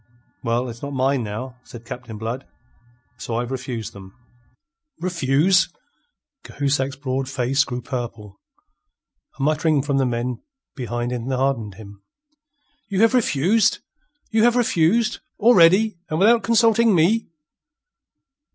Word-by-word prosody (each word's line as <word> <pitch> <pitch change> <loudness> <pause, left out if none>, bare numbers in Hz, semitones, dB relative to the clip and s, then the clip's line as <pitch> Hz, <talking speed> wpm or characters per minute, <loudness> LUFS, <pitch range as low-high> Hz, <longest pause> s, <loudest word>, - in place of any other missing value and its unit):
"Well, 120 +1 -1
it's 120 -1 -9
not 140 0 -5
mine, 135 0 +1
now," 120 +4 -6
said 120 -1 -12
Captain 120 -3 -8
Blood. 115 +5 -5 0.7
"So, 115 - -5
I've 120 +2 -2
refused 125 -4 -5
them." 95 -1 -13 0.8
"Refuse'!" 175 +1 +2 0.7
Cahusac's 140 -1 -1
broad 135 -1 -3
face 135 +1 +1
grew 125 -2 -6
purple. 115 -6 -6 1.0
A - - -2
muttering 155 -1 +2
from 140 -1 0
the 135 - +2
men 120 +1 -3 0.3
behind 120 -1 -3
enheartened 125 -3 -2
him. 100 -1 -13 0.9
"You 195 0 0
have 225 +2 +5
refuse'? 215 - +2 0.5
You 220 -1 +2
have 240 +1 +4
refuse' 220 -1 +2 0.2
already 200 -2 +5
and 155 - -1
without 225 +6 +5
consulting 230 0 +3
me?" 195 +8 +2
135 Hz, 120 wpm, -22 LUFS, 120-185 Hz, 1.0 s, have